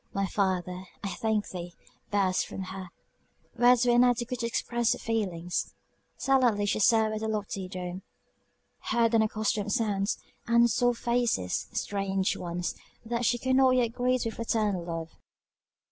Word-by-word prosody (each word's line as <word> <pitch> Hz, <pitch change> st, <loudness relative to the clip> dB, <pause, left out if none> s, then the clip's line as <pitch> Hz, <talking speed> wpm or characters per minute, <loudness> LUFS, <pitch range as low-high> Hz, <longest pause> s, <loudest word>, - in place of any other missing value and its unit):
My 195 Hz, 0 st, +1 dB
Father, 185 Hz, -2 st, -1 dB, 0.2 s
I 200 Hz, -, -2 dB
thank 220 Hz, 0 st, -1 dB
thee! 175 Hz, -1 st, -7 dB, 0.3 s
burst 195 Hz, -3 st, +1 dB
from 190 Hz, -, -6 dB
her 185 Hz, -1 st, -7 dB, 0.7 s
words 245 Hz, +1 st, +5 dB
were 240 Hz, -, +4 dB
inadequate 245 Hz, 0 st, +2 dB
to 235 Hz, -, -1 dB
express 235 Hz, 0 st, 0 dB
her -, -, -5 dB
feelings. 185 Hz, -6 st, -2 dB, 0.4 s
Silently, 245 Hz, -6 st, +3 dB
she 205 Hz, -, 0 dB
surveyed 220 Hz, 0 st, +3 dB
the 220 Hz, -, -3 dB
lofty 205 Hz, -3 st, -3 dB
dome; 180 Hz, 0 st, -6 dB, 0.9 s
heard 235 Hz, -1 st, +2 dB
unaccustomed 215 Hz, -2 st, +1 dB
sounds; 205 Hz, -1 st, 0 dB, 0.3 s
and 235 Hz, 0 st, +5 dB
saw 245 Hz, +2 st, +2 dB
faces, 235 Hz, -, 0 dB
strange 195 Hz, -1 st, -1 dB
ones, 175 Hz, 0 st, -3 dB, 0.3 s
that 235 Hz, +1 st, -1 dB
she 240 Hz, -, +3 dB
could 260 Hz, +1 st, +1 dB
not 260 Hz, -1 st, +5 dB
yet 245 Hz, -2 st, +2 dB
greet 250 Hz, 0 st, +1 dB
with 225 Hz, -, -2 dB
fraternal 215 Hz, -5 st, -1 dB
love. 165 Hz, -1 st, -5 dB
215 Hz, 145 wpm, -28 LUFS, 190-235 Hz, 0.9 s, words